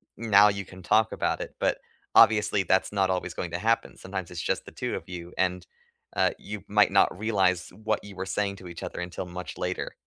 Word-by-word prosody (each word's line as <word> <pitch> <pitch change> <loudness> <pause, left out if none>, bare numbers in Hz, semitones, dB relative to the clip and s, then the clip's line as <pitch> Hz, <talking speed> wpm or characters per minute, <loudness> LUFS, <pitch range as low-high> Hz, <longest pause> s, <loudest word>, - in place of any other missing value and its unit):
Now 105 -2 +6
you 100 -1 -1
can 95 0 -13
talk 110 +4 +3
about - - -1
it." - - -6
But - - +1 0.4
obviously 105 -3 +6
that's 95 +3 +1
not 95 -2 +2
always 90 -1 -1
going 90 - -4
to 85 - -2
happen. 115 +2 0
Sometimes 95 -2 -6
it's 85 - -4
just - - -1
the - - -10
2 - - -3
of - - -7
you, 90 -1 -7
and, 90 -2 0 0.5
uh, - - +3
you 105 -2 -7
might 105 -1 +4
not 100 - +4
realize 95 -5 +1
what 110 0 0
you 100 -1 -10
were 95 - -4
saying 100 0 -1
to 95 - -11
each 85 - -9
other - - -5
until 90 +1 -5
much 90 0 -7
later. 90 0 -3
95 Hz, 220 wpm, -27 LUFS, 90-105 Hz, 0.5 s, Now